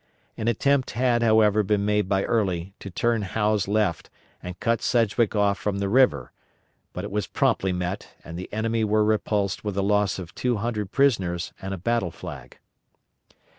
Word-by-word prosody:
An 110 - -4
attempt 135 +3 +2
had, 120 -2 +2
however, 110 -2 +4
been 100 0 0
made 105 -2 +1
by 95 0 +2
Early 95 -5 -1
to 100 - -8
turn 115 +4 0
Howe's 105 +1 0
left 105 -4 0 0.3
and 90 0 -8
cut 115 -1 0
Sedgwick 115 -2 +1
off 100 -1 +2
from 100 -1 -2
the 100 0 -1
river; 105 - +3 0.6
but - - -6
it - - -6
was 105 +1 -2
promptly 95 - +1
met 90 +1 -3 0.2
and 85 - -9
the 90 +2 -7
enemy 115 +1 0
were 110 0 +2
repulsed 105 -2 0
with 105 -2 -3
a 100 - +1
loss 105 -1 +1
of 90 -3 -8
two 125 -2 -1
hundred 105 -2 -3
prisoners 95 -11 +1
and 95 0 -5
a 95 - -3
battle 115 0 0
flag. - - -10
105 Hz, 175 wpm, -25 LUFS, 95-115 Hz, 0.6 s, however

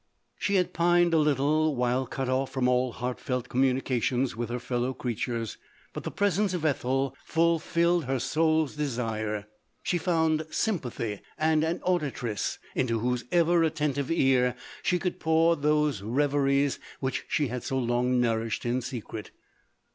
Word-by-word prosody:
She 200 - 0
had 180 -1 +1
pined 175 0 +3
a 160 - +5
little 150 +1 +2
while 125 +1 0
cut 135 +1 -3
off 130 +1 0
from 130 -2 0
all 125 0 +2
heart 125 +2 -4
felt 125 -1 -3
communication 130 -1 +1
with 120 0 -3
her 120 - -2
fellow 125 +1 -2
creatures, 115 -2 -3 0.3
but - - -6
the - - -3
presence 200 -1 +1
of 165 -3 -3
Ethel 135 -2 0
ful 165 0 +2
284 170 +2 0
LODORE. 170 - +4
rilled 175 -4 +1
her 130 0 -1
sours 155 +2 +1
desire; 110 -7 -2 0.4
she 175 - 0
found 160 -2 +1
sympathy, 120 - -2 0.2
and 155 0 +2
an 165 +2 -1
auditress, 140 - -1 0.2
into 115 -3 0
whose 125 +2 -1
ever 175 0 +4
attentive 150 -4 0
ear 130 -6 +3 0.3
she 180 - +2
could 180 0 -3
pour 160 +1 +3
those 150 -6 +1
reveries 140 +4 +1 0.2
which 130 -1 -2
she 145 -4 0
had 125 +1 -3
so 135 - -2
long 125 0 +1
nourished 115 -1 0
in 120 +2 0
secret. 115 -4 -6
135 Hz, 160 wpm, -28 LUFS, 125-160 Hz, 0.4 s, a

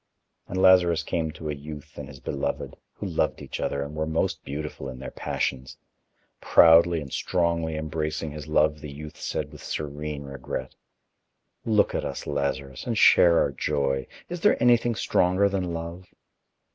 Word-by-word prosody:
And 95 - -3
Lazarus 90 -3 +5
came 80 -1 -1
to 80 -1 -7
a - - -2
youth 75 0 -9
and - - -7
his 65 - -11
beloved, 70 +2 -3 0.2
who - - -7
loved - - 0
each - - -7
other 70 0 -1
and 70 +1 -7
were 80 0 -2
most 80 +1 -1
beautiful 70 -1 -5
in 65 - -8
their 65 0 -7
passions. 65 0 -3 0.6
Proudly 85 0 +6
and 70 -2 -8
strongly 85 -3 0
embracing 80 0 -3
his 75 0 -8
love, 75 0 +2
the 75 -2 -7
youth 75 +2 -10
said - - -3
with - - -12
serene 75 0 -4
regret: 65 -1 -6 0.9
"Look 110 -2 +3
at - - -1
us, - - -5
Lazarus, 70 -2 -3
and - - -1
share 85 -1 +6
our - - +1
joy. 70 -1 -1 0.2
Is 175 -1 -6
there 210 - +4
anything 120 -1 +4
stronger 95 0 +2
than 95 -3 -2
love?" 85 +2 -6
75 Hz, 165 wpm, -26 LUFS, 70-85 Hz, 0.9 s, Proudly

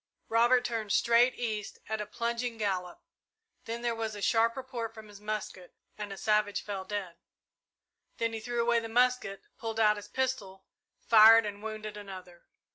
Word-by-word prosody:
Robert 240 +2 +4
turned 225 -3 -2
straight 235 +4 +4
east 215 -4 -4
at 220 0 -2
a 210 - -5
plunging 235 +1 -3
gallop, 185 -4 -3 0.6
then 230 +1 -5
there 240 -1 +1
was 225 -1 -3
a - - -7
sharp 230 +2 +3
report 245 -4 -5
from 215 -1 -11
his 205 0 -13
musket 210 -4 -5 0.2
and 210 -1 -6
a 195 - -6
savage 210 0 +1
fell 200 -2 -4
dead. 190 -3 -5 1.0
Then 230 0 -1
he 225 - -3
threw 240 +2 -3
away 235 0 +3
the 225 0 -6
musket, 245 -4 +1 0.2
pulled 225 -1 -4
out 210 -1 +4
his 205 0 -9
pistol, 210 -7 -3 0.4
fired 225 0 +8
and 205 -1 -6
wounded 215 -1 -6
another. 185 -4 -10
220 Hz, 170 wpm, -30 LUFS, 205-235 Hz, 1.0 s, fired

